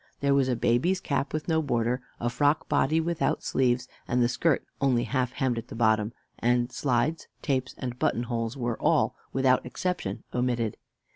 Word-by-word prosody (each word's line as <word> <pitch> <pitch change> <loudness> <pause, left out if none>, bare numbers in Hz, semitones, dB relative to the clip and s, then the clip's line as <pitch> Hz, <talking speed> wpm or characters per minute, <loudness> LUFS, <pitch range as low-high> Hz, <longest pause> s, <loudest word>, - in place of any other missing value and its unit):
There 140 0 +2
was 140 -2 +3
a 125 - +2
baby's 120 +11 +2
cap 140 -5 -1
with 155 0 -3
no 160 -2 +2
border, 120 -3 0 0.2
a 120 - -1
frock 145 +5 +1
body 155 +4 +2
without 170 0 0
sleeves, 125 -1 +1 0.2
and 125 - +1
the 120 - +4
skirt 145 +4 +1 0.2
only 125 -3 +3
half 130 -2 -1
hemmed 130 -4 0
at - - -9
the - - -8
bottom; 110 -1 +2 0.3
and 120 +1 +2
slides, 135 +5 0 0.2
tapes, 130 -2 -1
and 125 -1 -5
buttonholes 120 -4 -1
were 120 -3 -2
all, - - +3 0.2
without 130 -1 +3
exception, 125 - -3
omitted. 120 -3 0
125 Hz, 170 wpm, -27 LUFS, 120-140 Hz, 0.3 s, the